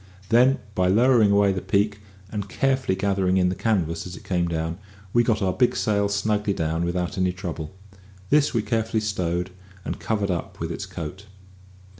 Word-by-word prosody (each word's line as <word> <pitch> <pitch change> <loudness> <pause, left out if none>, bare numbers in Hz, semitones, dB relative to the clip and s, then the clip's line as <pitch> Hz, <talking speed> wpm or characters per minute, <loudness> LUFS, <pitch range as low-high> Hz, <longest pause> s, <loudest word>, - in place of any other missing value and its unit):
Then, 125 +4 +5 0.2
by 90 -2 +2
lowering 115 +2 +5
away 100 0 +4
the 95 - -3
peak, 100 +1 +1 0.3
and 105 -2 -4
carefully 130 -3 +1
gathering 95 -1 +1
in 90 -1 +3
the 90 - -2
canvas 85 -7 -1
as 90 - -8
it - - -12
came 90 -2 0
down, 80 +1 -3 0.3
we 120 - +5
got 110 -3 +1
our 95 -1 +1
big 125 -1 +2
sail 100 -1 +1
snugly 105 0 0
down 80 -1 -1
without 90 0 -2
any 90 0 +2
trouble. 85 -2 -6 0.6
This 150 -1 +4
we 115 -3 0
carefully 115 -1 0
stowed 90 -4 -2 0.3
and - - -4
covered 105 -3 -1
up 85 - -4
with - - -3
its - - -5
coat. 90 +6 -7
100 Hz, 180 wpm, -24 LUFS, 90-110 Hz, 0.6 s, Then